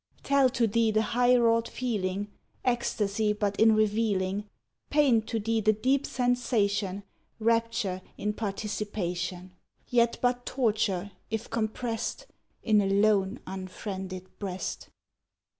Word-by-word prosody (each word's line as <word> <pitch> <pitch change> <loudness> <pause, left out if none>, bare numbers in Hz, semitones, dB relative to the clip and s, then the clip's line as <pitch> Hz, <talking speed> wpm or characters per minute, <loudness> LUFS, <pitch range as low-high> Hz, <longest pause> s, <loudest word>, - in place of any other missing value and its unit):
Tell 280 -2 +4
to 245 -2 +1
thee 225 +1 +2
the 215 0 +2
high 245 +1 +5
wrought 230 -1 +3
feeling, 205 -5 -2 0.4
Ecstasy 215 -4 +1
but 205 -1 -1
in 220 0 +6
revealing; 205 -2 +1 0.4
Paint 265 -7 +3
to 225 - -1
thee 225 +1 0
the 215 +1 +4
deep 260 +6 +1
sensation, 210 -6 0 0.3
Rapture 230 -4 0 0.2
in 210 0 -1
participation; 195 -4 -3 0.3
Yet 235 -1 +2
but 245 0 +1
torture, 210 -6 0 0.2
if 220 +1 -4
comprest 230 - -2 0.4
In 215 -2 +4
a 195 - 0
lone, 200 +1 +2
unfriended 185 0 -6
breast. 190 -2 -4
215 Hz, 115 wpm, -28 LUFS, 200-230 Hz, 0.4 s, in